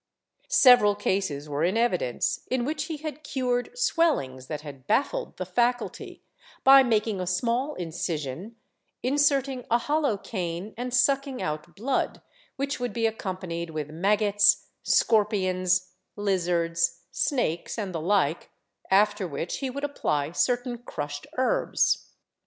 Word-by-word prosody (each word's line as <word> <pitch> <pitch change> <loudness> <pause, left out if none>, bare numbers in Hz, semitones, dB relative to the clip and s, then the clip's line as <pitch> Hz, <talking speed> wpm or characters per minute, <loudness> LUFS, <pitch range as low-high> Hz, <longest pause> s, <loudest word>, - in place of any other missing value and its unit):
Several 245 -6 +6
cases 190 -8 -1
were 145 +1 -2
in 185 +6 +1
evidence 240 - 0
in 255 -2 0
which 300 +1 -2
he 315 -1 -5
had 305 -1 -6
cured 250 -3 -1
swellings 295 - +1
that 150 -1 -4
had 140 -4 -11
baffled 285 - 0
the - - -3
faculty, 245 0 -1 0.4
by 270 0 +9
making 220 -5 +1
a 180 - -3
small 240 +10 0
incision, 165 - -4 0.5
inserting 275 -1 +2
a 235 - +4
hollow 290 -2 0
cane 185 0 -5
and 250 +2 -4
sucking 270 +1 +2
out 155 +2 -4
l^lood, 255 +6 -1 0.4
which 275 0 -2
would 245 0 -3
be 230 -1 0
accompanied 185 -6 -3
with 155 -2 -5
maggots, 205 +3 +3 0.2
scorpions, 185 -4 +2 0.2
lizards, 170 -4 0
snakes 235 - -1
and 200 -4 -3
the 165 - -3
Hke, 175 -3 +1 0.4
after 205 0 +3
which 160 +2 -4
he 270 - -2
would 280 +3 -6
apply 150 - -1
certain 245 +5 0
crushed 145 -10 -6
herbs. 260 0 +1
210 Hz, 130 wpm, -26 LUFS, 170-255 Hz, 0.5 s, by